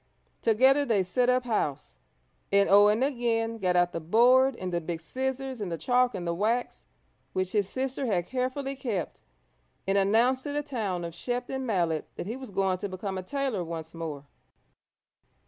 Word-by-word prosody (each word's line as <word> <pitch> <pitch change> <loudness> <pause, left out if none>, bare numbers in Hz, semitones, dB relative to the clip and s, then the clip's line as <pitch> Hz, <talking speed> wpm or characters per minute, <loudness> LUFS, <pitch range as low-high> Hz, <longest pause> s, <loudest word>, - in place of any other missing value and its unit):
Together 260 +6 +4
they 220 -8 +2
set 245 +8 +1
up 250 0 +3
house, 210 - -2 0.5
and 200 0 +4
Owen 210 +4 +5
again 230 -4 0
got 180 -2 +1
out 175 0 +3
the 165 - -3
board 245 +9 +4
and 185 -4 -5
the 170 - 0
big 165 0 -4
scissors 260 +5 -4
and 190 -4 -3
the 165 - -2
chalk 245 - +2
and 180 -2 -4
the 170 - 0
wax 220 +7 -1 0.5
which 185 0 -1
his 205 -3 +1
sister 265 0 -2
had 180 -6 0
carefully 260 +3 -2
kept, 230 -10 -4 0.6
and 195 +1 +2
announced 230 +6 +3
to 290 +1 -5
the 295 0 -1
town 210 -11 -3
of 170 - -6
Shepton 250 +5 -3
Mallet 170 -7 0
that - - -5
he 220 +5 -4
was 260 -2 -9
going 190 -2 0
to 200 - -4
become 190 +1 -4
a 185 - -3
tailor 260 -2 -2
once 165 -1 -6
more. 155 -4 -6
215 Hz, 180 wpm, -28 LUFS, 180-255 Hz, 0.6 s, Owen